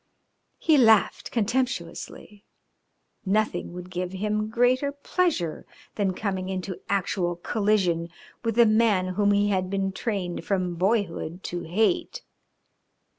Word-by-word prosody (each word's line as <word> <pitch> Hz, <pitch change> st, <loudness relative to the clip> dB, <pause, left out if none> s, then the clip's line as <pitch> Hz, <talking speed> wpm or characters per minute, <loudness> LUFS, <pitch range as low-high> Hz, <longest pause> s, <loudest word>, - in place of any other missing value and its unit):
He 315 Hz, -4 st, +4 dB
laughed 225 Hz, -4 st, +4 dB
contemptuously. 215 Hz, -3 st, -3 dB, 0.8 s
Nothing 215 Hz, 0 st, 0 dB
would 180 Hz, +1 st, -8 dB
give 180 Hz, 0 st, -3 dB
him 210 Hz, +2 st, -1 dB
greater 250 Hz, +5 st, +2 dB
pleasure 285 Hz, -, -1 dB, 0.3 s
than 195 Hz, -3 st, -1 dB
coming 190 Hz, -3 st, -3 dB
into 185 Hz, -1 st, -4 dB
actual 180 Hz, -2 st, 0 dB
collision 180 Hz, -3 st, 0 dB, 0.3 s
with 230 Hz, -2 st, -1 dB
the 235 Hz, 0 st, +6 dB
man 215 Hz, -4 st, +3 dB
whom 205 Hz, +2 st, +2 dB
he 205 Hz, 0 st, +3 dB
had 185 Hz, -2 st, 0 dB
been 195 Hz, 0 st, -1 dB
trained 190 Hz, -4 st, -3 dB
from 185 Hz, -3 st, -1 dB
boyhood 185 Hz, -2 st, -1 dB
to 175 Hz, 0 st, -4 dB
hate. 220 Hz, -, 0 dB
200 Hz, 120 wpm, -26 LUFS, 185-220 Hz, 0.8 s, the